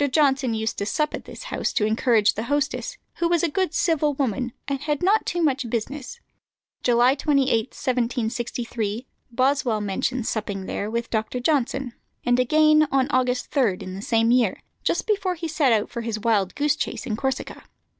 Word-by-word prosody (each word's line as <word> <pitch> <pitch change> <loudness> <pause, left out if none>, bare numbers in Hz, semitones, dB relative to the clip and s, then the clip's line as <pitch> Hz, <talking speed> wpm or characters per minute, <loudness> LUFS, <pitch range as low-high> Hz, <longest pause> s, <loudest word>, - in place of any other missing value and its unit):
Johnson 270 -5 +2
used 220 0 -2
to 200 - -1
sup 300 +6 0
at - - -6
this - - -9
house - - -1
to 210 - +2
encourage 220 -1 +3
the 220 - -4
hostess, 290 - -1 0.2
who 340 - +1
was 345 -1 +2
a - - +4
good 370 +2 0
civil 305 -4 +2
woman, 250 -2 -1 0.2
and 280 -1 -1
had 295 +1 -1
not 415 +4 +3
too 345 -1 0
much 270 -5 +1
business. 250 +4 -4 0.6
July 245 +1 +4
28, 275 -3 +2
1763, 235 -3 -2 0.2
Boswell 255 -2 +1
mentions 210 +4 -2
supping 200 -3 -3
there 205 - -3
with 235 +1 -3
Dr. 220 +2 -1
Johnson; 265 -2 0 0.3
and 245 0 +3
again, 305 +4 +5
on 270 +1 +2
August 250 -1 0
3, 235 -10 +2
in 185 - -6
the 195 - -6
same 225 +1 +2
year, 240 -6 +2 0.2
just - - 0
before 395 -4 0
he 330 0 -4
set 310 -4 +2
out 215 -2 +1
for 235 - -4
his 225 -1 -3
wildgoose 225 +6 +1
chase - - -3
in 215 - -2
Corsica. 265 +4 -3
255 Hz, 175 wpm, -24 LUFS, 225-290 Hz, 0.6 s, again